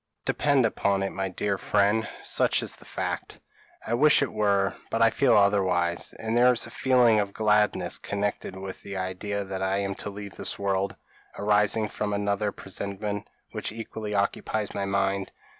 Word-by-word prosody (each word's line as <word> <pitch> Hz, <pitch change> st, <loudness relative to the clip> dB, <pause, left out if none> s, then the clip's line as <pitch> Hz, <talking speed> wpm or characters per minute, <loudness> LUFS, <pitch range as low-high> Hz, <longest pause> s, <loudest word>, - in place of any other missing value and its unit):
Depend 140 Hz, -4 st, +3 dB
upon 100 Hz, -3 st, +1 dB
it, 95 Hz, -, -2 dB
my 95 Hz, 0 st, -2 dB
dear 100 Hz, +1 st, -2 dB
friend, 105 Hz, +2 st, +2 dB
such -, -, +1 dB
is -, -, -2 dB
the -, -, -17 dB
fact." -, -, -4 dB, 0.5 s
"I 115 Hz, -, -2 dB
wish 145 Hz, +4 st, +5 dB
it 140 Hz, -, -3 dB
were; 100 Hz, -2 st, +2 dB
but 115 Hz, -, -1 dB
I 115 Hz, -1 st, +5 dB
feel 125 Hz, -2 st, +4 dB
otherwise, 95 Hz, -4 st, +2 dB
and 110 Hz, +1 st, -3 dB
there 125 Hz, +1 st, +6 dB
is 120 Hz, -, 0 dB
a 115 Hz, -, -11 dB
feeling 125 Hz, -4 st, +4 dB
of 100 Hz, -1 st, -2 dB
gladness 105 Hz, -1 st, +2 dB
connected 100 Hz, -2 st, -3 dB
with 95 Hz, 0 st, -7 dB
the 100 Hz, -1 st, -6 dB
idea 95 Hz, +2 st, -3 dB
that 95 Hz, -1 st, -5 dB
I 95 Hz, +1 st, +1 dB
am 100 Hz, 0 st, -1 dB
to -, -, -4 dB
leave 100 Hz, -1 st, -8 dB
this -, -, -4 dB
world, 100 Hz, -1 st, -1 dB, 0.4 s
arising 105 Hz, +1 st, +2 dB
from 105 Hz, 0 st, -3 dB
another 100 Hz, 0 st, 0 dB
presentiment, 100 Hz, +2 st, -4 dB, 0.2 s
which -, -, -4 dB
equally 110 Hz, -1 st, -5 dB
occupies 100 Hz, +1 st, -1 dB
my 100 Hz, -, -2 dB
mind." 100 Hz, 0 st, 0 dB
100 Hz, 175 wpm, -27 LUFS, 100-110 Hz, 0.5 s, there